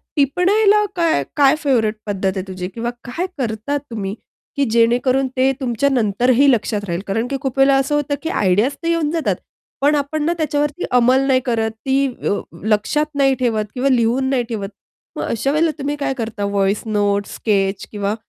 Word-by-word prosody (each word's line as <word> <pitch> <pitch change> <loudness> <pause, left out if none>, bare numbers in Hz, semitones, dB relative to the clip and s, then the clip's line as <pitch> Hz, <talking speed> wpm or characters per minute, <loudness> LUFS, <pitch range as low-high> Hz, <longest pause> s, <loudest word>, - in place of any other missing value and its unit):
टिपण्याला 400 +9 +3
काय 330 - +2
काय 280 0 +5
फेव्हरेट 225 -6 +2
पद्धत 195 -2 -1
आहे - - -1
तुझी 185 -1 -5
किंवा 235 +1 -3
काय 325 +9 -3
करता 240 +3 -2
तुम्ही 220 -8 -5 0.4
की 280 -1 +1
जेणेकरून 250 +3 +3
ते 265 +1 +4
तुमच्या 255 +2 0
नंतरही 250 +3 +3
लक्षात 215 -3 0
राहील. 170 +2 -2
कारण 225 +5 -1
की 275 - -2
खूप 270 -2 -3
वेळेला 270 0 +5
असं 275 +2 0
होतं 290 -1 0
की 320 - -2
आयडियाज 205 - +2
तर - - -2
येऊन 335 -3 +1
जातात, 330 -2 0 0.5
पण 295 +2 +4
आपण 295 +1 -1
ना 340 - +2
त्याच्यावरती 295 +1 -1
अंमल 250 +2 +4
नाही 260 -1 +4
करत 225 -2 0
ती 270 +1 +2 0.2
व 205 - +1 0.2
लक्षात 220 +8 +1
नाही 270 -1 +3
ठेवत 220 -4 0
किंवा 265 +2 0
लिहून 250 +2 +2
नाही 255 -3 +1
ठेवत. 200 -3 -4 0.5
मग - - -3
अशा 270 +5 -1
वेळेला 315 +1 +2
तुम्ही 290 +1 -2
काय 280 -2 -2
करता 220 -3 -3
व्हॉइस 200 0 0
नोट्स, 205 -1 0
स्केच 195 -2 0
किंवा 205 0 -2
255 Hz, 180 wpm, -19 LUFS, 215-280 Hz, 0.5 s, काय